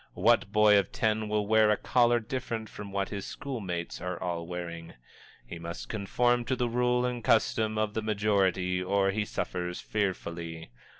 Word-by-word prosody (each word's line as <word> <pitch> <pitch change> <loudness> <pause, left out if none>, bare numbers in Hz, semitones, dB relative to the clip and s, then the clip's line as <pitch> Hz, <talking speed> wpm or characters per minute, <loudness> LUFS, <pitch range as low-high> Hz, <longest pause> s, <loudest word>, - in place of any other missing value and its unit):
What 100 - +3
boy 105 -1 +6
of 95 - -3
ten 110 -1 0
will 105 -1 +1
wear 110 0 +4
a 105 - +3
collar 120 -1 +3
different 115 -2 -4
from 105 -1 -8
what 100 0 -1
his 100 -2 -4
school 135 -4 -5
mates 90 -5 -4
are 90 -1 -4
all 85 -2 -3
wearing? 85 -1 -6 0.5
He 85 - -8
must 85 +1 -7
conform 120 +4 +1
to 130 - 0
the 125 -1 0
rule 125 +1 +1
and 125 -2 -3
custom 110 -1 +2
of 110 -1 0
the 110 - -1
majority 100 -4 +1
or 95 +1 +2
he 105 +1 -1
suffers 90 -3 -3
fearfully. 85 - -3
105 Hz, 175 wpm, -29 LUFS, 90-110 Hz, 0.5 s, boy